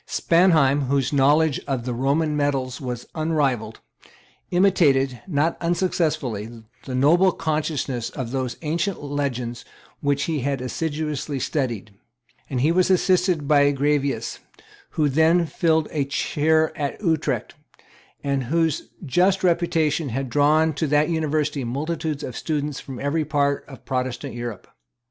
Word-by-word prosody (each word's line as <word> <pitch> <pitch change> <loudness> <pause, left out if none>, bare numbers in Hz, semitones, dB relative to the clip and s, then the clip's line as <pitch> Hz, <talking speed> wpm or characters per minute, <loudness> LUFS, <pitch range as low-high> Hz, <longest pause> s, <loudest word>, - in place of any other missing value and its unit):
Spanheim, 155 -6 +3
whose 135 0 0
knowledge 145 +2 +3
of 130 -4 -2
the 125 - -2
Roman 145 +5 +1
medals 135 -3 -1
was 125 -2 -5
unrivalled, 145 -9 -1 0.7
imitated, 145 -9 +3
not 160 -1 0
unsuccessfully, 150 - -1 0.2
the 130 - -4
noble 170 +8 +4
conciseness 150 -7 -2
of 125 -3 -5
those 130 -2 -2
ancient 165 +3 -2
legends 125 -5 -3 0.4
which 140 0 0
he 160 -3 -1
had 135 +1 -1
assiduously 150 +1 -3
studied; 120 -8 -2 0.6
and 130 -3 -1
he 150 +5 +3
was 185 +2 +3
assisted 180 -4 +2
by 145 -1 +5
Graevius, 140 -4 -1 0.6
who 155 -2 +3
then 160 +4 +3
filled 160 -1 +1
a 150 -3 0
chair 155 +3 +1
at 145 -2 -3
Utrecht, 160 -4 0 0.7
and 140 -2 -1
whose 160 +3 0 0.2
just 185 +7 +2
reputation 165 -3 +1
had 130 +1 -3
drawn 155 +2 +3
to 155 +2 -1
that 150 +2 +2
University 155 -3 0
multitudes 150 +4 -3
of 125 - -6
students 150 -3 -2
from 130 -3 -8
every 145 +3 0
part 140 -1 0
of 135 - -13
Protestant 125 -3 -3
Europe. 120 -3 -6
145 Hz, 130 wpm, -23 LUFS, 135-160 Hz, 0.7 s, by